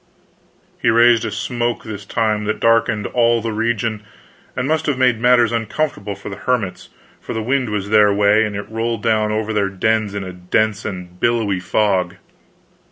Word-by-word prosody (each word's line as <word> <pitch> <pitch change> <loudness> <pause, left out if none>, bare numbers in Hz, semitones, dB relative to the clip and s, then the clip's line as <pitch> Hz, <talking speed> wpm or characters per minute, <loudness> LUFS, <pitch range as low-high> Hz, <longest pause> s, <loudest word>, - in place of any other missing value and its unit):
He - - +3
raised 115 0 +4
a - - -3
smoke 120 +2 -2
this 100 -2 -8
time 110 -2 0
that 110 - -2
darkened 115 -2 +2
all 120 -1 +2
the 115 0 -3
region, 110 -1 -1 0.6
and 125 +1 -1
must 155 +1 0
have 145 -3 0
made 125 -3 +2
matters 120 -2 +4
uncomfortable 115 -2 -2
for 100 - -9
the 100 - -7
hermits, 120 -7 -2 0.3
for - - -7
the 110 - -3
wind 130 0 0
was 100 -1 -3
their 105 -1 +5
way, 105 +2 +3
and 105 -2 -3
it 105 - -5
rolled 115 0 -3
down 110 -2 +1
over 110 0 -2
their 100 -2 +1
dens 105 +1 0
in 100 - -3
a 95 -1 -7
dense 100 +4 -1
and 90 -2 -7
billowy 110 -5 +1
fog. 95 -2 0
110 Hz, 180 wpm, -19 LUFS, 100-115 Hz, 0.6 s, their